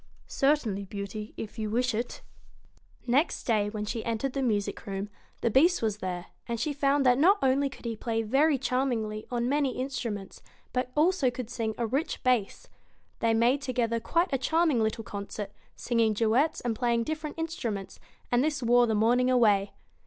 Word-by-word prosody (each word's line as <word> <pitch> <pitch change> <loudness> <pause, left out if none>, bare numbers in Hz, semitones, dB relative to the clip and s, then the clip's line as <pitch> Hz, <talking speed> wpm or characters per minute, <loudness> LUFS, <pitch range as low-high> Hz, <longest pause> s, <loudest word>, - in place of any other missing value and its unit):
92 - - -14
'Certainly, 250 -9 +1
Beauty! 205 +2 -6
if 220 +2 -7
you 215 -1 -2
wish 245 +3 +1
it.' 235 +3 -4 0.8
Next 270 +7 +1
day 210 -3 +1
when 210 0 -4
she 225 +1 -3
entered 230 +3 -2
the 275 - -1
music 210 -6 -1
room, 195 +1 -4 0.3
the 235 - +1
Beast 330 - +4
was 215 -2 0
there, 180 -2 -4 0.2
and 235 -1 -2
she 295 +5 -1
found 280 0 +2
that 250 0 +5
not 380 +8 +6
only 275 +1 +3
could 265 - -14
BEAST 235 - -2
he 225 - -6
play 225 -1 0
very 275 +6 +3
charmingly 240 -5 -1
on 240 -1 -1
many 280 -1 0
instruments, 235 -7 -4 0.3
but 250 0 -1
also 315 -3 +3
could 245 -1 -6
sing 220 -2 -2
a 235 - 0
rich 270 +8 -2
bass. 245 -6 0 0.5
They 230 -1 +2
made 245 +5 +3
together 240 -4 0
quite 340 +7 0
a 270 - +1
charming 315 -2 +2
little 220 +1 -1
concert, 200 0 -6 0.2
singing 230 -2 +1
duets 235 +9 +2
and 235 -2 -1
playing 235 -1 +1
different 310 +2 -4
instruments, 240 - -4 0.3
and 245 +1 +3
this 295 -3 -1
wore 240 +1 +5
the 220 - +1
morning 245 +4 +3
away. 210 -6 +3
240 Hz, 180 wpm, -28 LUFS, 220-270 Hz, 0.8 s, not